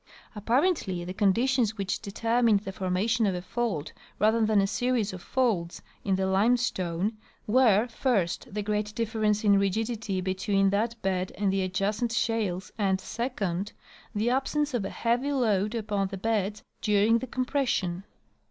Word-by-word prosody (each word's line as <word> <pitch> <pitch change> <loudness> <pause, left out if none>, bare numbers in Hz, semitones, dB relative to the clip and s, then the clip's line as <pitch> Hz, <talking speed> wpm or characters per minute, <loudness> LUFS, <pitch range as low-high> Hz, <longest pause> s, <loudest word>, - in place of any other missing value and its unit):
Apparently 225 - 0
the 180 - -5
conditions 225 +3 +2
which 195 -1 -2
determined 225 +1 +1
the 195 - -6
formation 195 +5 0
of 190 - 0
a 180 - -3
fault 200 -7 -2 0.2
rather 220 +2 +3
than 215 -1 +3
a 195 - +3
series 230 -1 0
of 185 - -7
folds 210 -11 -1 0.2
in 195 -2 +1
the 190 0 0
lime 200 +6 +3
stone 190 -3 -1 0.3
were, 225 -1 +4
first, 225 -7 -1
the 210 +1 -3
great 210 0 -2
difference 215 -2 0
in 200 -2 +5
rigidity 210 0 -1
between 195 +1 +1
that 225 +3 -1
bed 185 -1 -1
and 195 -2 +1
the 195 - +1
adjacent 200 +5 -1
shales 215 -6 -1
and, 190 -2 +2
second, 205 -5 -3 0.4
the 220 +4 +1
absence 285 +2 0
of 240 -5 0
a - - -3
heavy 245 +5 0
load 215 -5 +1
upon 205 -3 -1
the 195 0 -6
beds 210 0 -1 0.2
during 215 +1 +3
the 260 - -6
compression. 250 -9 -1
210 Hz, 155 wpm, -27 LUFS, 195-235 Hz, 0.4 s, in